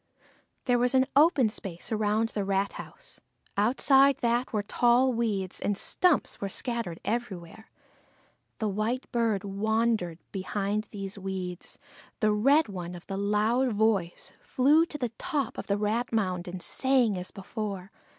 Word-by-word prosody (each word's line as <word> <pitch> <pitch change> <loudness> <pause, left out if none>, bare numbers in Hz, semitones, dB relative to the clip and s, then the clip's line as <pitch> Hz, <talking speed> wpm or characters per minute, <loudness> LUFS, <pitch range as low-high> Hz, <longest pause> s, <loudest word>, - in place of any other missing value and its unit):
There 245 -1 +3
was 245 +2 +2
an 260 0 +5
open 290 -4 +5
space 195 -4 -6
around 215 +1 +1
the 205 - -3
rat 195 0 0
house; - - -11 0.3
outside 270 +5 +4
that 240 +1 +1
were 210 -3 -1
tall 245 +4 +3
weeds, 205 -6 -1
and 205 -1 0
stumps 355 - +1
were 200 - -2
scattered 230 -6 -4
everywhere. 220 -3 -4 0.9
The 220 - -1
white 215 +6 -1
bird 225 -5 +1
wandered 210 -3 0
behind 200 +2 -2
these 200 -1 -6
weeds, 185 -2 -5 0.4
the 215 -1 +3
red 275 +9 +4
one 180 -3 -6
of 175 - -11
the 195 - -5
loud 215 +5 +1
voice 205 -5 0
flew 300 +6 +3
to 300 - -6
the 250 -4 -2
top 300 -6 -2
of - - -7
the 200 -1 +1
rat 220 +4 -1
mound 185 -6 -1
and 180 0 -5
sang 260 -6 +2
as 180 0 -3
before. 195 -1 -6
215 Hz, 150 wpm, -28 LUFS, 195-245 Hz, 0.9 s, an